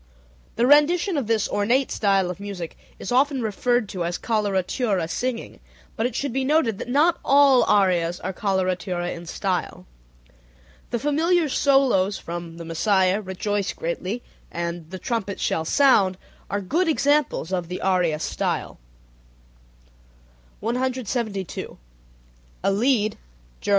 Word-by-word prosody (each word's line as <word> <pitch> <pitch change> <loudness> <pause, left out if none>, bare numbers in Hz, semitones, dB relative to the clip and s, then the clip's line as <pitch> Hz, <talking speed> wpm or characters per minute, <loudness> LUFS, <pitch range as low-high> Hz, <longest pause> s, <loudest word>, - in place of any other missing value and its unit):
The 235 - +2
rendition 325 +7 +4
of 275 -7 -1
this 220 -2 +1
ornate 240 +6 +1
style 195 -3 +2
of 180 - -9
music 195 -5 -6 0.2
is - - -6
often 265 0 +2
referred 235 +2 0
to 180 -3 -3
as 175 +1 -2
"coloratura 200 -3 0
singing," 245 +6 -4 0.4
but 230 0 +1
it 245 - -8
should 280 -3 -2
be 265 +1 0
noted 260 -7 +2
that - - -6
not 315 +6 +3
all 275 -2 +5
arias 180 -4 +2
are 190 - -3
coloratura 185 -2 -1
in 170 0 -9
style. 185 +1 -3 1.0
The 240 - -1
familiar 315 +5 +2
solos 260 -9 +3
from 170 -1 -7
The 170 - -8
Messiah 190 +3 +2
"Rejoice 200 +1 -2
Greatly," 185 +7 -4 0.3
and 170 -1 -4
"The 185 - -6
trumpet 200 -2 -3
shall 160 - 0
sound" 200 - +4 0.3
are 200 - -1
good 330 - 0
examples 290 - +1
of 180 -2 -1
the 180 +1 -5
aria 180 -5 +1
style. - - -3 1.8
172. 235 - -3 0.9
A 195 - +3
lied 215 0 +1 0.4
(Ger. - - -5
205 Hz, 130 wpm, -23 LUFS, 185-260 Hz, 1.8 s, all